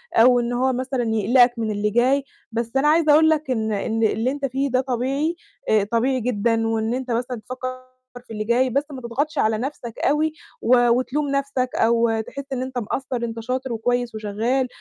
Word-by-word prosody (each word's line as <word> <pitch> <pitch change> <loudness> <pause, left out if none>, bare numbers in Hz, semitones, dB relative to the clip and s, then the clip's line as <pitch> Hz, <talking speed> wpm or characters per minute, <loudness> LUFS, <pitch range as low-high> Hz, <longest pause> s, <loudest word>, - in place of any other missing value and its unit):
أو 245 +2 +6
إن 240 0 -2
هو 260 +2 +1
مثلًا 255 0 -2
يقلقك 235 +3 +4
من 220 -1 -1
اللي 210 0 0
جاي، 255 +6 +2 0.3
بس 230 0 -3
أنا 275 +2 +3
عايزة 310 0 +4
أقول 315 +1 +6
لك 310 -3 0
إن 220 -3 -1
إن 220 +2 -1
اللي 225 +3 +1
أنت 285 0 -3
فيه 270 +1 -1
ده 255 +1 +3
طبيعي، 270 +6 -1 0.3
آآ 215 -2 +4
طبيعي 235 +5 0
جدًا، 225 -1 0
وإن 225 0 0
أنت 255 0 -3
مثلًا 240 0 -2
تفكّر 255 0 -6 0.4
في - - -9
اللي 215 -1 -3
جاي، 240 +4 +2
بس 275 +4 +1
ما 265 -2 -7
تضغطش 285 +6 -2
على 220 -3 +2
نفسك 245 -1 -5
أوي، 305 +2 +1 0.3
و 245 0 +4
وتلوم 255 +5 0
نفسك 275 -2 -1
أو 230 -1 +2
تحس 280 +5 -7
إن 255 - -2
أنت 260 0 -5
مقصر. 255 +3 -3
أنت 230 -1 -4
شاطر، 255 +2 -3
وكويس، 245 +1 -1
وشغّال، 220 +5 -1
245 Hz, 195 wpm, -22 LUFS, 225-265 Hz, 0.4 s, أو